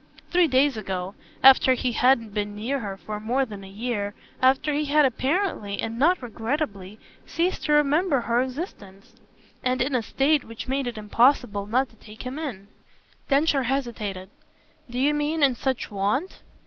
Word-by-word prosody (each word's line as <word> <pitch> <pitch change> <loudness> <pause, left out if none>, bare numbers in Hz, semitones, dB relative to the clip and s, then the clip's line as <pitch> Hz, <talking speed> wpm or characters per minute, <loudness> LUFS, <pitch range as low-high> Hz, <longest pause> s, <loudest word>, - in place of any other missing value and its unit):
"Three 350 -1 +4
days 265 -2 +3
ago 190 -2 -4 0.3
after 265 -1 +7
he 250 0 -1
hadn't 235 -3 +2
been 205 -1 -3
near 245 +7 -2
her 200 -4 -5
for 210 +4 -6
more 245 +5 0
than 205 -4 -9
a 190 - -11
year, 205 -1 -3 0.3
after 265 +3 +3
he 300 +1 0
had 295 +1 +4
apparently, 265 - -1
and 225 +1 -3
not 335 +1 +3
regrettably, 225 - -4 0.3
ceased 350 +3 -1
to 300 - +2
remember 295 0 +3
her 235 +1 +1
existence; 250 - -7 0.5
and 255 0 0
in 265 +3 0
a 250 - +2
state 280 +5 +1
which 230 +2 -8
made 270 0 -1
it 240 - -5
impossible 215 -1 +2
not 255 +5 +1
to - - -22
take 215 +1 -12
him 255 +4 -5
in." 225 -11 -6 0.6
Densher 280 0 +3
hesitated. 225 -7 -3 0.6
"Do 240 - -6
you 280 +4 +3
mean 295 +1 0
in 270 -2 +5
such 260 -1 -3
want 210 - -1
250 Hz, 170 wpm, -25 LUFS, 210-280 Hz, 0.6 s, after